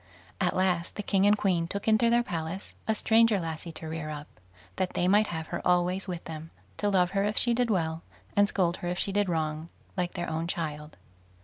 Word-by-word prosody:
At - - +1
last 180 -2 +1
the 205 - -4
king 195 0 +3
and 210 +1 +5
queen 175 -5 +1
took 200 +4 -4
into 220 +2 +4
their 240 +1 +4
palace 170 -1 -5
a 220 - +2
stranger 225 -1 +4
lassie 165 0 -5
to 160 - -7
rear 160 -1 -4
up, 150 -1 -6 0.5
that 185 - -1
they 175 - +1
might 205 +3 +5
have 160 -2 -4
her 175 - -3
always 180 +2 +2
with 175 -2 -4
them, 160 0 -7 0.3
to 205 - +1
love 180 -2 +3
her 195 0 +1
if 210 +1 -1
she 240 - +4
did 245 0 +1
well, 165 -5 0 0.3
and 205 0 +4
scold 175 -2 +1
her 175 - -5
if 175 0 -2
she 200 - 0
did 205 -1 +1
wrong, 160 -1 -2 0.3
like 180 -2 -1
their 175 -1 -2
own 160 +1 -2
child. 150 -3 -4
180 Hz, 220 wpm, -28 LUFS, 165-205 Hz, 0.5 s, and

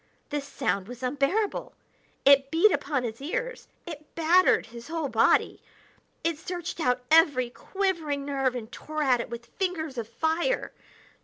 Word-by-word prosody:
This 290 -1 -3
sound 195 -6 -1
was 245 +1 -9
unbearable; 285 - 0 0.5
it 275 0 +6
beat 335 +7 +5
upon 270 -5 -1
his 230 +1 -5
ears; - - -4 0.2
it 305 -3 -10
battered 340 +3 +4
his 235 0 -11
whole 320 -3 -2
body; 225 -2 +3 0.6
it 330 -2 0
searched 350 0 -5
out 250 -4 +1
every 285 -7 +5
quivering 325 -6 -2
nerve 270 -3 0
and 225 -2 -6
tore 310 0 -4
at 250 -4 +3
it - - -7
with 235 0 -7
fingers 320 -6 -3
of 225 - -4
fire. 320 - 0
290 Hz, 150 wpm, -27 LUFS, 250-335 Hz, 0.6 s, it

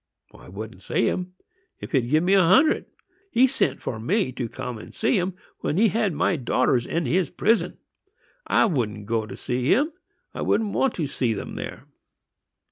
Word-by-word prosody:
I 60 +6 -14
wouldn't 105 +1 -8
see 115 - 0
him, 180 0 -2 0.5
if - - -8
he'd 125 -5 +1
give 155 +4 +3
me 185 +2 +3
a 195 - +6
hundred! 260 - +4 0.4
He 255 -6 +5
sent 250 - 0
for 110 - -3
me 165 - 0
to 120 -2 -4
come 125 -2 -6
and - - -12
see 225 - +1
him, 180 +1 -2 0.2
when 155 - -1
he 220 +2 +5
had 215 -1 +1
my 160 +3 +1
daughters 125 -1 +1
in 165 -1 -1
his 170 +4 +1
prison. 205 -6 +1 0.7
I - - +4
wouldn't 110 - -1
go 110 0 -1
to - - -8
see 125 +1 -2
him,—I 305 +7 -2
didn't 215 -3 +1
want 270 -3 +1
to 165 - -1
see 125 -5 -1
them - - -6
there!" - - -7
155 Hz, 185 wpm, -24 LUFS, 120-200 Hz, 0.7 s, a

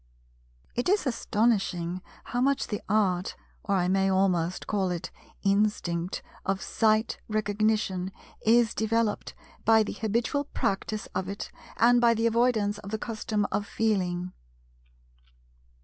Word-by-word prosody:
It 245 +8 0
is 405 -2 +3
astonishing 205 -7 0 0.2
how 245 - -2
much 275 +1 +2
the 210 - -3
Art—or 200 0 -1
I 180 -2 +2
may 195 +1 +2
almost 185 -2 +1
call 195 -3 0
it 175 -2 -4 0.3
instinct—of 195 -2 -1
Sight 220 +1 +1
Recognition 210 -3 0 0.3
is 230 0 +4
developed 220 0 0 0.3
by 225 -1 +5
the - - -4
habitual 235 +6 0
practice 205 -3 -2
of 185 0 -2
it 200 - -5 0.3
and 240 +1 +5
by 235 -1 +5
the 225 +1 0
avoidance 225 -3 +2
of 200 -1 -9
the 220 - -2
custom 215 -2 -2
of 205 - -1
"Feeling." 185 -5 0
210 Hz, 120 wpm, -28 LUFS, 190-225 Hz, 0.3 s, by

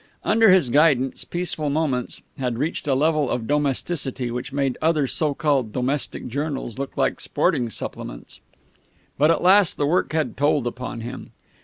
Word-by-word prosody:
Under 225 0 +4
his 185 -10 +4
guidance 140 -3 +3
Peaceful 170 -4 -2
Moments 140 -4 -1 0.2
had 125 -3 -2
reached 150 +3 -2
a 135 - +2
level 150 -1 +2
of 120 -2 -2
domesticity 140 -2 -1
which 125 +3 -5
made 135 -2 0
other 155 -2 +2
so 145 +2 0
called 135 -8 +1
domestic 130 +4 -2
journals 135 -2 -4
look 140 - -5
like - - +1
sporting 145 -6 0
supplements. - - -7 0.8
But 150 +2 +5
at 165 - +2
last 190 0 +5
the 145 - +1
work 170 +6 +1
had 155 -1 -1
told 145 -2 +2
upon 120 -1 -5
him. 120 +3 -8
145 Hz, 160 wpm, -23 LUFS, 125-155 Hz, 0.8 s, But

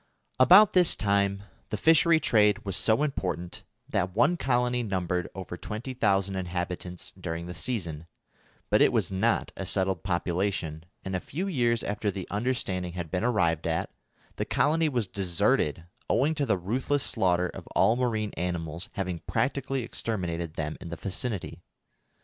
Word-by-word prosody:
About 185 +10 +8
this 180 -2 +4
time 100 -1 +1 0.3
the 105 - -2
fishery 165 - +5
trade 105 -6 +3
was 100 -3 -2
so 110 +7 +2
important 90 - -3 0.2
that 90 +1 -1
one 145 +10 +4
colony 125 -4 +1
numbered 90 -4 -2
over 95 -2 -6
20,000 100 -3 -1
inhabitants 90 -1 -4
during 85 -2 -5
the 90 - -6
season; 85 - -3 0.6
but - - +5
it - - +6
was - - +1
not 110 +5 +1
a - - -5
settled 95 -1 +1
population, 85 -2 -2 0.2
and 95 -1 -2
a - - 0
few 165 - -4
years 120 - +1
after 105 +1 -1
the 95 -2 -5
understanding 100 -6 -1
had 85 -3 -5
been 90 - -1
arrived 85 -10 +1
at, 80 0 -1 0.5
the - - 0
colony 160 +2 +2
was 120 -7 -1
deserted 85 -4 +1 0.3
owing 145 +6 +3
to 145 -3 -1
the 100 -4 +2
ruthless 130 +10 -1
slaughter 90 -1 +1
of - - -9
all 110 +4 +4
marine 110 -4 -1
animals 85 -1 -3
having 90 -3 -3
practically 135 -1 -1
exterminated 85 -8 -3
them 75 0 -3
in 85 - -7
the 85 - -4
vicinity. 95 -2 -4
100 Hz, 155 wpm, -28 LUFS, 90-120 Hz, 0.6 s, About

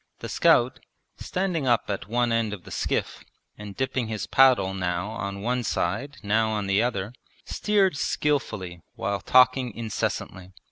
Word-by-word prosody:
The - - -7
scout, 125 +2 +3 0.4
standing 180 -7 -2
up 120 -2 +3
at 100 -3 -4
one 120 +2 +1
end 115 -2 0
of 95 -4 -8
the - - -12
skiff - - -2 0.3
and 105 -2 -9
dipping 130 -2 -1
his 110 -1 -3
paddle 125 -8 +4
now 90 +1 -2
on 100 -3 -5
one 125 +2 0
side 115 +9 -2
now 110 +2 +2
on 105 -2 -2
the 100 +2 +2
other, 115 -3 -2 0.3
steered 200 -5 +1
skilfully 105 - -2
while 100 0 -2
talking 125 +2 +4
incessantly. 95 -4 -4
110 Hz, 150 wpm, -25 LUFS, 100-130 Hz, 0.4 s, paddle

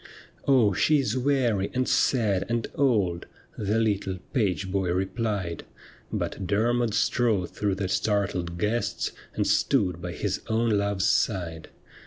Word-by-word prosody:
' - - -28
Oh, 125 -7 +5
she 150 +10 +3
is 135 -2 0
weary, 125 -7 +1
and 130 0 +1
sad, 105 -7 +2
and 115 -1 0
old,' 105 -11 +1 0.3
The 105 +1 -1
little 100 -4 0 0.2
page 95 -6 0
boy 95 -2 0
replied; 95 -2 -2 0.5
But 95 - -3
Dermod 115 +2 +1
strode 115 -5 +1
through 100 -2 -1
the 95 0 -2
startled 95 -4 -1
guests, 105 +6 -1 0.2
And - - 0
stood 90 -3 +1
by 90 0 -5
his 100 +1 -2
own 115 +1 +1
love's 100 -2 +1
side. 85 -8 0
100 Hz, 140 wpm, -26 LUFS, 95-115 Hz, 0.5 s, Oh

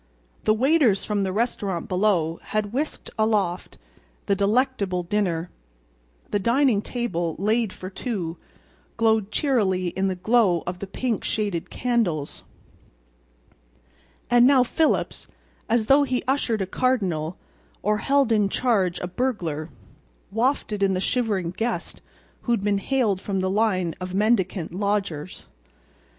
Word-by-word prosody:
The 215 - +5
waiters 260 -4 +3
from 210 -2 0
the 190 -1 -1
restaurant 200 -4 -1
below 180 -4 +1
had 215 0 -3
whisked 295 +4 -3
aloft 205 -5 0 0.5
the - - +2
delectable 200 -3 +1
dinner. 175 -3 -1 0.8
The 205 - +1
dining 235 0 +3
table, 175 -10 -2
laid 215 +2 +1
for 185 +1 -8
two, 185 -7 -4 0.6
glowed 220 -3 +2
cheerily 205 -9 +1
in 190 +3 -1
the 190 - -1
glow 195 -3 +2
of 180 +1 -4
the 200 - -5
pink 235 +3 -2
shaded 205 -6 -2
candles. 215 - -1 1.9
And 240 0 +6
now 265 -2 +6
Phillips, 310 +5 0 0.4
as 225 -1 +2
though 275 +5 +5
he 255 -3 0
ushered 240 -6 +1
a - - -2
cardinal—or 190 -2 -2
held 275 +1 +2
in 210 -3 +3
charge 195 -7 +1
a 180 - -2
burglar—wafted 175 - -3
in 195 -1 +3
the - - 0
shivering 200 -5 0
guest 225 +6 -3 0.4
who 240 - 0
had 230 - 0
been 200 0 +1
haled 215 -4 0
from 195 -2 -2
the 185 0 0
line 190 -5 +1
of 185 0 -4
mendicant 195 -5 +1
lodgers. 195 -5 -2
205 Hz, 130 wpm, -24 LUFS, 185-235 Hz, 1.9 s, And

